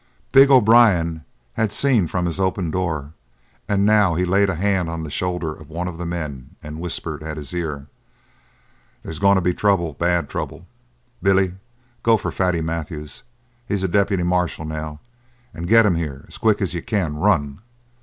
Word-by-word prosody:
Big 135 Hz, +1 st, +7 dB
O'Brien 105 Hz, -, +5 dB, 0.3 s
had 110 Hz, -2 st, 0 dB
seen 120 Hz, -8 st, +2 dB
from 90 Hz, +2 st, -2 dB
his 85 Hz, +2 st, -2 dB
open 95 Hz, -3 st, 0 dB
door 80 Hz, -5 st, -3 dB, 0.6 s
and 100 Hz, -1 st, +2 dB
now 105 Hz, -5 st, +4 dB
he 90 Hz, +2 st, +1 dB
laid 100 Hz, +2 st, +3 dB
a 95 Hz, -, -1 dB
hand 95 Hz, -1 st, 0 dB
on 80 Hz, -1 st, -4 dB
the 75 Hz, -, -6 dB
shoulder 90 Hz, -2 st, -2 dB
of 75 Hz, -1 st, -14 dB
one 85 Hz, +3 st, -4 dB
of 85 Hz, -2 st, -7 dB
the 85 Hz, -, -4 dB
men 75 Hz, -7 st, -6 dB
and 75 Hz, +1 st, -7 dB
whispered 80 Hz, -3 st, -4 dB
at 80 Hz, 0 st, -6 dB
his 75 Hz, +2 st, -6 dB
ear: 80 Hz, -5 st, -4 dB, 1.2 s
"There's 80 Hz, -, -7 dB
going 100 Hz, +1 st, +5 dB
to 95 Hz, -, +2 dB
be 90 Hz, 0 st, +1 dB
trouble; 90 Hz, -6 st, +1 dB
bad 85 Hz, +1 st, 0 dB
trouble, 90 Hz, -, -6 dB, 0.6 s
Billy. 95 Hz, -2 st, +3 dB, 0.5 s
Go 115 Hz, -1 st, +4 dB
for -, -, -4 dB
Fatty 90 Hz, -3 st, 0 dB
Matthews 80 Hz, -2 st, -5 dB, 0.5 s
he's 100 Hz, -2 st, -1 dB
a -, -, +2 dB
deputy 95 Hz, 0 st, +1 dB
marshal 90 Hz, -2 st, 0 dB
now 75 Hz, -1 st, -6 dB, 0.5 s
and 85 Hz, +1 st, -6 dB
get 115 Hz, +2 st, +6 dB
him 100 Hz, -, +3 dB
here 75 Hz, -5 st, -4 dB
as -, -, -10 dB
quick 110 Hz, -2 st, +2 dB
as 90 Hz, -, -2 dB
you 85 Hz, -, -3 dB
can. 90 Hz, -9 st, -2 dB
Run!" 70 Hz, -2 st, +1 dB
85 Hz, 180 wpm, -21 LUFS, 80-100 Hz, 1.2 s, Big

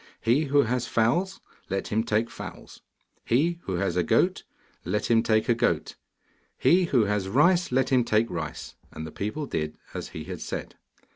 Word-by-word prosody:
He 125 Hz, +8 st, +2 dB
who 140 Hz, 0 st, +4 dB
has 125 Hz, +1 st, -1 dB
fowls, 175 Hz, +13 st, +1 dB, 0.3 s
let 95 Hz, 0 st, -2 dB
him 110 Hz, +1 st, +1 dB
take 115 Hz, +1 st, 0 dB
fowls; -, -, -10 dB, 0.4 s
he 165 Hz, +8 st, +1 dB
who 95 Hz, -, -2 dB
has 90 Hz, -1 st, -1 dB
a 90 Hz, -, +3 dB
goat, -, -, +2 dB, 0.4 s
let 105 Hz, +3 st, -1 dB
him 115 Hz, -1 st, +5 dB
take 110 Hz, -1 st, +1 dB
a 120 Hz, -, +4 dB
goat; 115 Hz, -, 0 dB, 0.6 s
he 180 Hz, +1 st, +4 dB
who 130 Hz, -8 st, +3 dB
has 100 Hz, -2 st, -1 dB
rice, 170 Hz, -, +3 dB
let 130 Hz, +1 st, +2 dB
him 130 Hz, -2 st, +4 dB
take 110 Hz, 0 st, +2 dB
rice.' 80 Hz, -7 st, -5 dB, 0.2 s
And 80 Hz, 0 st, -7 dB
the 80 Hz, -, -8 dB
people 110 Hz, +10 st, -3 dB
did 75 Hz, -, -3 dB, 0.2 s
as -, -, -5 dB
he 80 Hz, -, -7 dB
had 90 Hz, +1 st, -7 dB
said. -, -, -5 dB
115 Hz, 185 wpm, -26 LUFS, 100-140 Hz, 0.6 s, him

